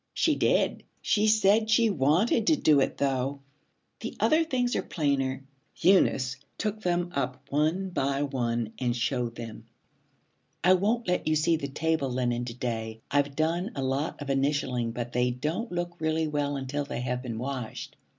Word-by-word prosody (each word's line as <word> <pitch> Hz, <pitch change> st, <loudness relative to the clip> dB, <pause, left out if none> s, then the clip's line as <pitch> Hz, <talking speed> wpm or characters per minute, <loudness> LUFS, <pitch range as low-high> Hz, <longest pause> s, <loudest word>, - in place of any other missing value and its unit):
'She -, -, +3 dB
did. -, -, +2 dB, 0.2 s
She 215 Hz, 0 st, +2 dB
said 215 Hz, 0 st, +4 dB
she 225 Hz, 0 st, +4 dB
wanted 185 Hz, -, +2 dB
to 315 Hz, -, +6 dB
do 155 Hz, -, +4 dB
it, 135 Hz, -, 0 dB
though. 135 Hz, 0 st, -1 dB, 0.6 s
The -, -, -6 dB
other 315 Hz, +1 st, +4 dB
things 250 Hz, -6 st, 0 dB
are -, -, +1 dB
plainer.' 135 Hz, -4 st, -1 dB, 0.3 s
Eunice 135 Hz, -8 st, +3 dB, 0.2 s
took 215 Hz, 0 st, -2 dB
them 175 Hz, -2 st, 0 dB
up 130 Hz, -1 st, -2 dB
one 160 Hz, +6 st, +1 dB
by 140 Hz, -3 st, 0 dB
one 120 Hz, -5 st, -2 dB
and 120 Hz, -2 st, 0 dB
showed 120 Hz, -1 st, -1 dB
them. 115 Hz, -2 st, -8 dB, 1.0 s
'I 180 Hz, +2 st, +6 dB
won't 215 Hz, +5 st, +1 dB
let 180 Hz, -2 st, 0 dB
you 155 Hz, -, +3 dB
see 155 Hz, +2 st, +3 dB
the 140 Hz, -3 st, -3 dB
table 155 Hz, 0 st, 0 dB
linen 120 Hz, -1 st, -1 dB
to 115 Hz, -1 st, -6 dB
day. 115 Hz, -3 st, -4 dB
I've 145 Hz, 0 st, +1 dB
done 170 Hz, +5 st, 0 dB
a 135 Hz, -, -2 dB
lot 135 Hz, +4 st, -1 dB
of 140 Hz, -, -8 dB
initialing, 135 Hz, -4 st, 0 dB
but 120 Hz, 0 st, -5 dB
they 125 Hz, 0 st, +2 dB
don't 155 Hz, -, -3 dB
look 175 Hz, 0 st, -3 dB
really 160 Hz, 0 st, +1 dB
well 145 Hz, -1 st, -1 dB
until 135 Hz, +2 st, -3 dB
they 140 Hz, -, -5 dB
have 125 Hz, 0 st, -2 dB
been 120 Hz, -4 st, -5 dB
washed.' 125 Hz, -2 st, -5 dB
140 Hz, 170 wpm, -28 LUFS, 125-175 Hz, 1.0 s, to